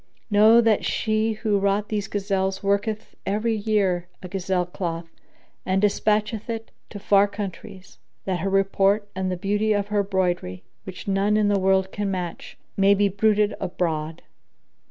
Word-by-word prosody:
Know 215 +3 +6
that 225 -3 +2
she 220 0 0
who 215 -2 0
wrought 200 +1 0
these 205 -2 -2
gazelles 195 -1 -2
worketh 210 +2 -1
every 215 +3 0
year 200 -5 0 0.2
a - - -5
gazelle 185 -1 -1
cloth 170 -2 -5 0.5
and 190 +1 +1
despatcheth 210 +2 0
it 225 -1 -5 0.2
to 210 - -8
far 200 0 +4
countries, 200 -1 -8 0.3
that 185 -2 -1
her 195 - -1
report 195 +1 +2
and 190 0 -2
the 180 - -2
beauty 205 +3 0
of 205 0 -1
her 205 -1 +2
broidery, 180 - -2 0.2
which 190 +1 -9
none 200 +2 +2
in 210 -1 +2
the 200 -1 +2
world 190 0 +2
can 205 -1 -2
match, 180 -3 -5 0.2
may 200 +1 +4
be 200 0 +2
bruited 210 +1 +2
abroad. 160 -3 -3
200 Hz, 155 wpm, -24 LUFS, 190-210 Hz, 0.5 s, Know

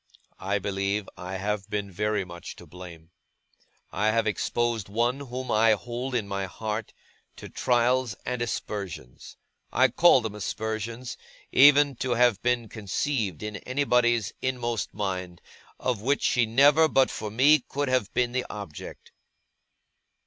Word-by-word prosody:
I 100 +2 -1
believe 100 +1 -2
I 90 +1 -6
have 100 +1 -3
been 100 -1 -3
very 105 +1 -1
much 85 -1 -9
to - - -13
blame. 85 -2 -12 0.8
I 105 - 0
have 115 +1 +2
exposed 115 0 -1
one 120 +5 0
whom 130 -2 -5
I 110 +1 +5
hold 120 +4 -4
in 110 -4 -1
my 100 -1 -2
heart, 110 +3 -4 0.4
to - - -10
trials 125 -2 +1
and 125 -1 -3
aspersions 95 - -5 0.3
I 130 0 +4
call 150 +1 +5
them 110 -2 -4
aspersions, 110 +3 -4 0.3
even 145 0 +6
to 125 -1 -1
have 120 -4 +3
been 120 -1 0
conceived 105 - -2
in 105 -1 -4
anybody's 125 -3 +1
inmost 120 -3 -2
mind 90 -4 -4 0.4
of 125 -5 -1
which 140 +5 0
she 120 -3 +2
never, 145 +7 +5
but 135 -3 +3
for 105 - -5
me, 140 +8 +5
could 145 +2 -3
have 130 -5 0
been 125 -1 +1
the 125 0 -2
object. 100 -8 -9
115 Hz, 140 wpm, -26 LUFS, 100-125 Hz, 0.8 s, even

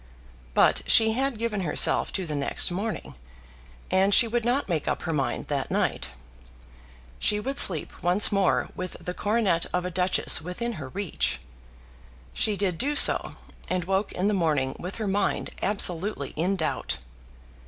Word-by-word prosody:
But - - +3
she 220 0 +5
had 260 +1 -2
given 220 -3 -2
herself 165 -5 +2
to 190 - -3
the 155 - -5
next 140 +4 0
morning, 205 +5 -5 0.8
and 195 +1 +4
she 235 - +7
would 235 +1 -2
not 250 +5 0
make 165 -6 -2
up - - -2
her 165 - -3
mind 135 -5 -2
that - - -2
night. - - -1 1.1
She 210 - +2
would 270 +6 -3
sleep 170 -5 +4
once 180 +4 +4
more 195 -2 +1
with 185 0 -6
the 180 - -6
coronet 205 -5 0
of 180 0 -2
a 180 - -4
duchess 180 0 +3
within 180 +9 -4
her 130 - -7
reach. 145 - -2 0.9
She 210 - 0
did 185 -4 -2
do 290 +3 0
so; - - +5 0.3
and 185 -1 -1
woke 190 +3 -1
in 185 +3 -1
the 210 - +1
morning 150 -8 0
with 180 +3 -7
her 220 - -4
mind 195 +1 -1
absolutely 185 -6 0
in 180 +5 -1
doubt. 160 -4 -3
190 Hz, 165 wpm, -25 LUFS, 170-210 Hz, 1.1 s, she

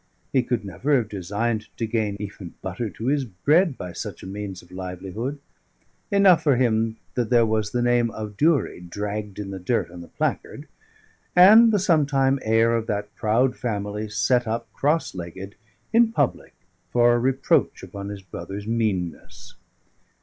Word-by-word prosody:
He 130 - +4
could 120 -3 -2
never 125 - 0
have 115 -4 -2
designed 105 +4 -2
to 115 - -1
gain 110 -3 -1
even 95 -4 -8
butter 95 +5 -3
to 110 +4 -8
his 140 +1 +1
bread 140 - +2
by 90 -1 -7
such - - -7
a - - -8
means 95 -1 -6
of 85 - -20
livelihood: 95 +8 -5 0.7
enough 200 -4 +5
for 145 -4 +3
him 115 -2 +1 0.2
that 120 -3 -1
there 120 -2 +5
was 110 -1 0
the 120 +1 -1
name 120 -1 +3
of 105 -2 -7
Durie 150 - +2
dragged 100 +3 -5
in 100 -2 -5
the 95 - -6
dirt 95 0 -1
on 90 0 -9
the 85 - -11
placard, - - -3 0.7
and 215 +6 +8
the 210 - +3
sometime 140 -7 +2
heir 115 +1 +3
of 115 -1 -2
that 105 0 -3
proud 120 +4 +1
family 105 -2 -3
set 110 +4 +1
up 115 -1 -4
cross 155 +4 0
legged 95 +3 -7 0.4
in 230 0 +5
public 145 - -1 0.4
for 120 0 +4
a 120 - +2
reproach 130 +2 +1
upon 100 0 -7
his 100 -1 -7
brother's 95 +3 -7
meanness. 105 -7 -3
110 Hz, 165 wpm, -24 LUFS, 100-130 Hz, 0.7 s, and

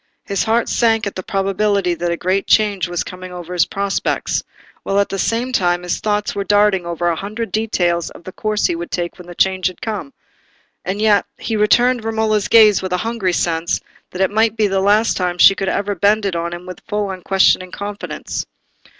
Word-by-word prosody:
His 200 0 -1
heart 230 +1 +1
sank 225 -2 +2
at 200 - -3
the 185 - -5
probability 195 -1 0
that 175 0 -2
a 170 - -1
great 190 +3 -1
change 205 -4 +2
was 175 -1 -2
coming 185 0 -9
over 180 0 -7
his 175 - +2
prospects, 200 0 -1 0.4
while 195 - -1
at 200 - +1
the 195 - -4
same 235 +5 0
time 175 -4 +1
his 180 - -2
thoughts 210 -1 -1
were 200 - -2
darting 205 -3 +2
over 170 0 -2
a 170 - +1
hundred 215 +6 -5
details 175 -6 0
of - - -14
the 185 - -8
course 215 +2 -1
he - - +1
would 170 +1 -6
take 175 0 -4
when 180 - -11
the 175 - -10
change 190 0 +2
had 185 - -6
come; 220 +3 -4 0.7
and 190 +3 -3
yet 210 -1 +3
he 225 - -3
returned 240 +3 +3
Romola's 220 -2 0
gaze 215 -3 +6
with 185 -1 -3
a - - +2
hungry 225 -6 -1
sense 170 0 0 0.3
that 180 - -5
it 190 - +2
might 220 +1 +2
be 215 - +3
the 195 -1 +1
last 210 +3 +3
time 180 -1 -1
she 195 - +8
would 195 -1 -1
ever 205 0 -1
bend 205 +3 +2
it 190 -3 -1
on 170 0 -2
him 175 +1 -7
with 185 -1 -9
full 210 -2 -2
unquestioning 185 0 +2
confidence. 205 +2 -5
195 Hz, 210 wpm, -18 LUFS, 180-215 Hz, 0.7 s, she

